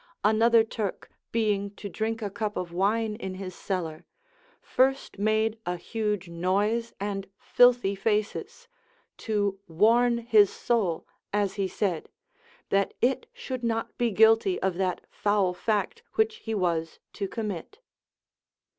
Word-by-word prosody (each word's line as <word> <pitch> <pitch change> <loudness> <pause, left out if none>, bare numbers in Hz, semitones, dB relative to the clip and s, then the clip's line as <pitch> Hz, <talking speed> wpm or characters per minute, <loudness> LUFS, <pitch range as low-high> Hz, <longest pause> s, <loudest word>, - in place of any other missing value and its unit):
Another 225 +2 +5
Turk 215 -3 -4 0.2
being 205 -3 0
to 205 - -7
drink 220 +3 -3
a 205 - -3
cup 215 0 -3
of 175 -2 -3
wine 210 +4 +1
in 190 -4 -5
his 185 -1 -6
cellar, 170 -5 -4 0.6
first 265 -5 0
made 220 +1 +1
a 180 - -2
huge 210 0 -2
noise 200 +7 0
and 195 -1 -3
filthy 245 -5 +4
faces, 210 - -2 0.5
to 205 -3 -1
warn 230 +8 +4
his 220 -4 +5
soul, 200 -9 0 0.3
as 205 -2 +1
he 195 -1 -1
said, 185 -4 -2 0.6
that 195 0 +1
it 260 +2 +1
should 255 -2 -6
not 225 -1 -1
be 240 -1 +2
guilty 225 - +4
of 190 -1 0
that 185 -2 -1
foul 205 -3 +1
fact 220 - -1
which 440 0 +2
he 225 - -4
was 165 -4 -1 0.2
to 200 - -3
commit. 210 - -5
210 Hz, 135 wpm, -27 LUFS, 195-225 Hz, 0.6 s, Another